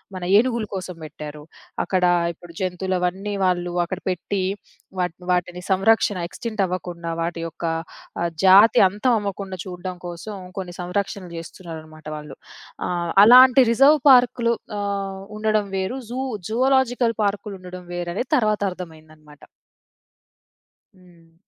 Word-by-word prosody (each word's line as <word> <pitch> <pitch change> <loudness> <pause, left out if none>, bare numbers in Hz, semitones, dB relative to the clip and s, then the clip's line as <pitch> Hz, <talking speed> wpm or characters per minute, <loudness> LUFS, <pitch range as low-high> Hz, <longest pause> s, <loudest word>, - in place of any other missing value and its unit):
మన 185 - -6
ఏనుగుల 235 -1 +1
కోసం 185 -1 -5
పెట్టారు. 150 0 -9 0.4
అక్కడ 185 -1 0 0.3
ఇప్పుడు 170 0 -15
జంతువులు 185 0 -2
అవన్నీ 190 +3 -2
వాళ్ళు 175 -1 0
అక్కడ 185 +1 -5
పెట్టి 185 +2 -2 0.6
వాటిని 180 0 -3
వాటిని 180 0 -1
సంరక్షణ 200 +1 +3
ఎక్స్‌టింక్ట్ 215 +2 -3
అవ్వకుండా 175 -2 -5
వాటి 170 0 -3
యొక్క 165 +1 -7 0.6
ఆహ్, 170 0 0
జాతి 200 +4 +7
అంతం 210 +6 +1
అవ్వకుండా 195 -2 -5
చూడడం 180 0 -6
కోసం 175 +5 -7 0.2
కొన్ని 180 -2 -6
సంరక్షణలు 185 0 -3
జేస్తున్నారన్నమాట 160 -2 -10
వాళ్ళు. 150 -2 -10 0.5
ఆహ్, 175 -1 -2
అలాంటి 255 +3 +8
రిజర్వ్ 275 +6 +5
పార్కులు 245 -2 +4 0.3
ఆహ్, 200 -1 -3 0.2
ఉండడం 215 -1 +1
వేరు. 190 0 0 0.2
జూ 245 - -5 0.3
జూలాజికల్ 250 0 +2
పార్కులు 205 0 -2
ఉండడం 180 0 -9
వేరు 175 0 -4
అని 230 - 0
తర్వాత 215 -5 +2
అర్థమైందన్నమాట. 155 -4 -12 1.6
హ్మ్. 170 -2 -22
185 Hz, 125 wpm, -22 LUFS, 175-210 Hz, 1.6 s, అలాంటి